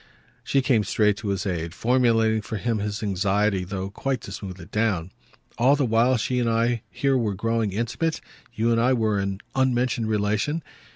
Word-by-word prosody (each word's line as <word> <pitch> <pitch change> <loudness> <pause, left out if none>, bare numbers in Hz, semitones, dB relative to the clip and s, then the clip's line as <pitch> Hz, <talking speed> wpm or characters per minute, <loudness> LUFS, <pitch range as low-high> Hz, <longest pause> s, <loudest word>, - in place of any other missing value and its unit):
She 135 -1 +1
came 120 -6 +3
straight 105 +1 +2
to 105 - -6
his 100 0 -1
aid, 85 -2 -3
formulating 115 -2 +2
for 110 - -5
him 115 +1 -1
his 105 +1 -3
anxiety, 100 0 +1
though 95 +1 -5
quite 135 +4 -2
to - - -9
smooth 95 -2 -7
it 85 - -12
down. 100 -6 0 0.5
"All 130 +4 +5
the 140 -2 +1
while 120 +2 +3
she 120 +3 -1
and 120 -1 +1
I 115 0 +1
here 135 -1 0
were 105 -4 -1
growing 115 +1 0
intimate, 120 - -1 0.3
you 115 0 0
and 115 0 +3
I 125 +2 +3
were 110 -4 +1
in 100 0 -3
unmentioned 125 -3 +1
relation? 110 +9 0
110 Hz, 185 wpm, -24 LUFS, 100-120 Hz, 0.5 s, All